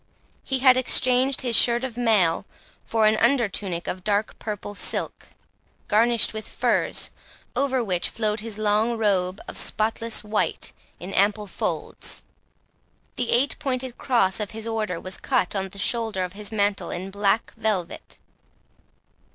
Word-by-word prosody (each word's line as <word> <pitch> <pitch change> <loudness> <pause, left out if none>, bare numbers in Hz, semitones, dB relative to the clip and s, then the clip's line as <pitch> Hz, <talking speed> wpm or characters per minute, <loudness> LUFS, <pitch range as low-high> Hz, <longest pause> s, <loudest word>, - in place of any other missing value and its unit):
He 265 - -1
had 260 -1 +6
exchanged 255 +1 +3
his 245 -3 +2
shirt 240 +2 +5
of 260 -4 -4
mail 210 -7 +2 0.4
for 225 -1 +2
an 215 0 +4
under 255 -3 +3
tunic 185 -3 -4
of 185 0 -4
dark 205 +1 0
purple 205 -1 -5
silk, - - -4 0.6
garnished 230 +1 +3
with 215 -1 -6
furs, - - +1 0.4
over 265 -3 +1
which 180 -5 0
flowed 215 -1 -1
his 215 -1 -5
long 215 +2 +1
robe 195 -3 +1
of - - -2
spotless 225 +1 0
white, 210 0 -2 0.3
in 190 +2 -7
ample 205 +1 +2
folds. 195 - -3 0.9
The 245 -2 -2
eight 260 +4 +2
pointed 255 -2 -3
cross 230 -8 +2
of 210 -2 -3
his 220 - -5
order 215 -6 -2
was 185 0 -4
cut 245 -8 0
on 195 -1 -2
the 200 - -14
shoulder 220 -2 -1
of 180 0 -5
his 210 +1 -5
mantle 205 -2 0
in 185 +2 -5
black 205 +2 0
velvet. 190 -6 -3
215 Hz, 150 wpm, -24 LUFS, 200-235 Hz, 0.9 s, had